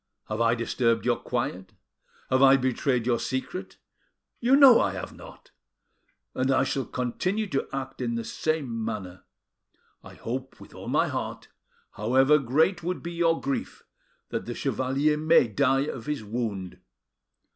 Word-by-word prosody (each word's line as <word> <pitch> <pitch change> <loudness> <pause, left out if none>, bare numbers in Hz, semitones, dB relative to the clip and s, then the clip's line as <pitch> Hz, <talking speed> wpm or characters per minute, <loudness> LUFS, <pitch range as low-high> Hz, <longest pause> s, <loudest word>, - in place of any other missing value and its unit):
Have 110 +1 -2
I 115 0 +3
disturbed 115 -1 0
your 120 -1 +2
quiet? 95 -6 -4 0.6
Have 130 0 +3
I 135 0 +7
betrayed 130 -1 0
your 120 -1 +1
secret? 130 +8 -4 0.6
You 250 +3 +4
know 275 -4 +8
I - - 0
have - - -6
not. - - -14 0.8
And 130 +1 0
I 130 -1 +3
shall 135 0 -2
continue 185 - -2
to 135 - -2
act 135 -1 -5
in 120 -1 -1
the 115 - -2
same 130 -4 -2
manner. 100 -5 -6 0.8
I - - -12
hope 130 +3 -6
with - - -14
all - - -10
my - - +2
heart, - - -5 0.4
however 130 +7 +3
great 155 +8 +1
would 180 +2 -3
be 170 - -5
your 165 -1 +2
grief; 140 0 -4 0.5
that - - -4
the - - -4
chevalier 140 +4 0
may 155 -4 +4
die 135 +5 +2
of 120 -6 -6
his 150 -6 -2
wound. 105 -4 -4
130 Hz, 155 wpm, -26 LUFS, 115-150 Hz, 0.8 s, know